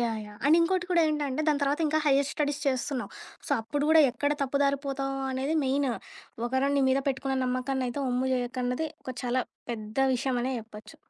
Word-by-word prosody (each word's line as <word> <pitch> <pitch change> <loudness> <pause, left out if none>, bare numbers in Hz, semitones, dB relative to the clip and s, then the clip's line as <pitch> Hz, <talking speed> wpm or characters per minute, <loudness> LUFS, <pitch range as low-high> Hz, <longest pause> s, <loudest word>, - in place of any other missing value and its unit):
Yeah! 230 -2 0
Yeah! 210 0 -13
And 305 +3 +6
ఇంకోటి 360 +1 +1
కూడా 345 -2 +4
ఏంటంటే, 295 -2 -1
దాని 295 -1 +2
తర్వాతింకా 300 +2 +2
హయ్యర్ 280 0 +4
స్టడీస్ 290 -1 -1
చేస్తున్నావు. 260 0 -1 0.4
సో, - - -8
అప్పుడు 285 +6 -2
గూడా 320 0 +7
ఎక్కడ 285 +4 -1
తప్పుదారిపోతావో 275 0 0
అనేది 265 +4 -1
మెయిను. 270 0 +1 0.6
ఒకరు 260 +3 +1
నీ - - +3
మీద 265 +1 +3
పెట్టుకున్న 265 0 -1
నమ్మకాన్నయితే 255 +1 -1
ఒమ్ము 250 +1 0
జెయ్యకన్నది 250 +3 -1 0.2
ఒక 255 - -6
చాలా 250 +1 +1 0.3
పెద్ద 215 -2 -6 0.2
విషయమనే 255 0 -1
జెప్పచ్చు. 215 -1 -11
270 Hz, 160 wpm, -28 LUFS, 250-285 Hz, 0.6 s, గూడా